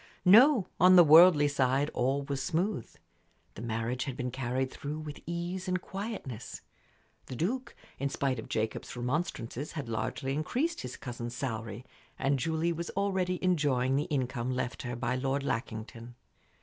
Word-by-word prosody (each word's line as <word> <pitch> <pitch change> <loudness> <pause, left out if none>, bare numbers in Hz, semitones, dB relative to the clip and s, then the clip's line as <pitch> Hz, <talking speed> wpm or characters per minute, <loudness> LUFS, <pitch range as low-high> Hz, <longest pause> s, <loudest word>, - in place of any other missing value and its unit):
No; 230 +3 +7
on 185 +1 +7
the 175 - +10
worldly 160 -1 +8
side 140 0 +1
all 135 +3 0
was 140 -1 -3
smooth. 170 - -1 0.6
The - - -9
marriage 115 +2 -2
had 135 -2 -5
been 125 -2 -3
carried 130 +1 -2
through 145 +2 -5
with 155 -2 -7
ease 175 +2 -3
and 180 0 0
quietness 190 - -6 0.7
The 130 - -6
Duke, 235 - -2 0.2
in 140 - 0
spite 135 -2 -1
of - - -8
Jacob's 110 +2 -3
remonstrances, 130 0 -3
had 145 -6 -5
largely 115 +4 -2
increased 250 - -1
his 125 - -7
cousin's 120 -1 -6
salary, 115 -2 -4 0.3
and 135 0 +1
Julie 160 +4 0
was 170 +1 -5
already 190 -2 0
enjoying 140 -7 +2
the 145 +2 +1
income 130 -3 -2
left 130 0 -2
her 125 -2 -4
by 120 +1 -1
Lord 135 +2 -1
Lackington. 115 -1 -5
140 Hz, 155 wpm, -30 LUFS, 125-170 Hz, 0.7 s, the